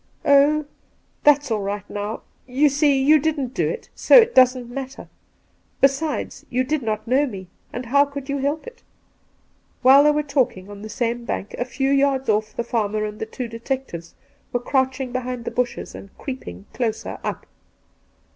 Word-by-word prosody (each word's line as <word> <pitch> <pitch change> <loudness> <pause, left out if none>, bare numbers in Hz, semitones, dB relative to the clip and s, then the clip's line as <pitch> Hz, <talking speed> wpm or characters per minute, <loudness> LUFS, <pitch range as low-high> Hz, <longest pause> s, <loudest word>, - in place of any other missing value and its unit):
' - - -29
Oh, 285 +2 +5 0.6
that's 290 -3 +4
all 215 -2 0
right 200 0 -4
now 205 +2 -5
— - - -40
you 275 +4 +3
see, 285 -1 +3
you 300 +3 +5
didn't 290 -4 -1
do - - 0
it, 475 - -5
so - - +4
it 470 -1 +6
doesn't 255 -1 +4
matter; 265 +2 -7 0.7
besides, 275 +3 0
you 255 +1 +1
did 300 +3 -1
not 220 -1 -3
know 270 +4 +3
me, 190 -6 -8 0.2
and 245 +1 -5
how 280 +4 +4
could 280 -1 -8
you 280 -1 -2
help 285 +3 -1
it 485 0 -10 1.1
V 255 - +5
WhUe 275 +2 +9
they - - +6
were 300 0 +1
talking, 250 -9 -1
on 200 0 -10
the 215 - -8
same 235 +1 -2
bank, 205 - -4
a 245 - 0
few 270 +1 -1
yards 275 -2 +2
off, 215 0 0
the 235 - -1
farmer 215 -2 -1
and 210 0 -7
the 220 - -4
two 250 +2 -5
detectives 230 -7 -5 0.4
were 245 - 0
crouching 260 0 -1
behind 250 -1 -4
the - - -3
bushes 245 -1 -2
and 195 - -10
creeping 255 -6 -7
closer 225 -3 -3
up. - - -4
255 Hz, 185 wpm, -22 LUFS, 230-280 Hz, 1.1 s, WhUe